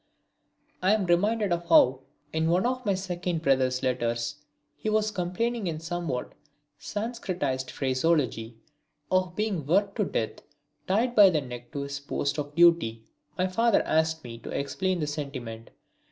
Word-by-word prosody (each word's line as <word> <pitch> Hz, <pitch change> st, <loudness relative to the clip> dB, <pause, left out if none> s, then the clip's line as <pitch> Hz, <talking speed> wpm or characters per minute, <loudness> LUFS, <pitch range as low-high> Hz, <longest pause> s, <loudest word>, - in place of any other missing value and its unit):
I 190 Hz, +4 st, +4 dB
am 205 Hz, -3 st, -1 dB
reminded 200 Hz, +3 st, +2 dB
of 170 Hz, 0 st, -3 dB
how 130 Hz, -5 st, +6 dB, 0.3 s
in 160 Hz, +1 st, +1 dB
one 180 Hz, +4 st, +2 dB
of 255 Hz, +1 st, -1 dB
my 200 Hz, -, +3 dB
second 180 Hz, -3 st, -3 dB
brother's 130 Hz, -2 st, +2 dB
letters 120 Hz, 0 st, -1 dB, 0.4 s
he 215 Hz, -, -3 dB
was 215 Hz, 0 st, +1 dB
complaining 205 Hz, +4 st, -1 dB
in 160 Hz, -2 st, -3 dB
somewhat 165 Hz, -6 st, -3 dB, 0.5 s
sanscritised 185 Hz, -, -3 dB
phraseology 130 Hz, -4 st, 0 dB, 0.5 s
of 185 Hz, -1 st, +1 dB
being 210 Hz, -6 st, -1 dB
worked 195 Hz, -, +1 dB
to 210 Hz, -, +2 dB
death 110 Hz, -, -3 dB, 0.5 s
tied 230 Hz, +6 st, +2 dB
by 205 Hz, -4 st, +8 dB
the 155 Hz, -4 st, +1 dB
neck 120 Hz, -2 st, -9 dB
to 140 Hz, -, -3 dB
his 140 Hz, 0 st, -4 dB
post 140 Hz, +1 st, -2 dB
of 145 Hz, 0 st, -5 dB
duty. 165 Hz, -10 st, +4 dB, 0.3 s
My 185 Hz, -, +2 dB
father 225 Hz, +4 st, +3 dB
asked 160 Hz, 0 st, +1 dB
me 115 Hz, -2 st, -8 dB
to -, -, -9 dB
explain 185 Hz, +5 st, -1 dB
the -, -, +1 dB
sentiment. 135 Hz, -7 st, -6 dB
170 Hz, 155 wpm, -27 LUFS, 135-190 Hz, 0.5 s, by